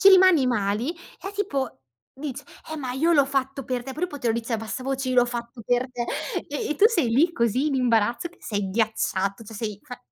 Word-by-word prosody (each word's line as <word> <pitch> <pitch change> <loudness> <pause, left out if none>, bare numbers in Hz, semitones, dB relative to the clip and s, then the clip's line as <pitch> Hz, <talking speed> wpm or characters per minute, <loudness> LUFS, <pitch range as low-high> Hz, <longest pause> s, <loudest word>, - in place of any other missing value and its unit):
ci 390 - +8
rimani 370 -7 +7
mali, 220 +3 0 0.3
e 390 - -5
tipo 275 - -2 0.3
dice: 275 0 -6 0.3
"Eh, 315 - -3
ma 260 -4 -3
io 320 +7 +2
l'ho 285 -4 +6
fatto 270 -1 -2
per 250 -1 -2
te," 265 - -6
però 305 - -7
poi 290 -5 -8
poi - - -21
te 245 - -2
lo - - +3
dice 235 +1 -3
a - - +3
bassa 225 +4 -5
voce: 270 0 -2
"Io 255 - 0
l'ho 245 - +6
fatto 235 -1 -6
per 245 +1 +2
te;" 245 -1 -3 0.4
e 435 -10 -2
tu 405 - +7
sei 340 - +1
lì, 290 +10 +3
così 235 +1 +1
in 285 - -1
imbarazzo 240 +3 +2
che 350 - -23
sei 205 -3 -2
ghiacciato, 200 -2 0
cioè 220 +1 -10
sei 210 -2 -4
fa 250 -5 -9
255 Hz, 235 wpm, -25 LUFS, 230-285 Hz, 0.4 s, ci